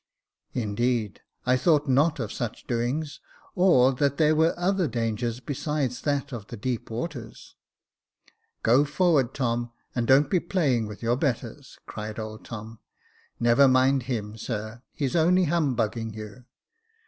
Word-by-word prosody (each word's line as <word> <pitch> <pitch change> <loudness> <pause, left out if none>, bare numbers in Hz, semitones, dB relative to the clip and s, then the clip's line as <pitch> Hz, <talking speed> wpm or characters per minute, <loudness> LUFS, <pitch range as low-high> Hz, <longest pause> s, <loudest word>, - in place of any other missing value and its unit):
" - - -65
Indeed, 115 -1 -1 0.2
I 125 +1 +4
thought 150 +2 +2
not 145 +4 +3
of 110 -3 -3
such 120 -3 -5
doings; 130 +6 -2 0.3
or 135 -8 +5
that 140 +1 0
there 155 -1 +4
were 160 +2 +3
other 185 0 +1
dangers 115 0 -2
besides 140 -1 -2
that 145 -1 -1
of 110 -4 -7
the 120 - -8
deep 120 +2 -3
waters." 120 -1 -6 0.6
" - - -36
Go 125 +5 +5
forward, 145 -3 +2
Tom, 120 -2 -1 0.2
and 120 -2 -1
don't 135 +2 +5
be 185 - +4
playing 150 - 0
with 105 +2 -9
your 120 +2 +1
betters," 130 -1 -3
cried 105 0 -6
old 110 -1 -6
Tom. 110 0 -8 0.3
" - - -35
Never 120 +4 +5
mind 130 +1 +4
him, 110 -3 -3
sir, 110 +1 -5
he's 140 -3 -2
only 180 +3 +4
humbugging 120 -9 0
you." 110 +3 -9
125 Hz, 150 wpm, -26 LUFS, 115-145 Hz, 0.6 s, or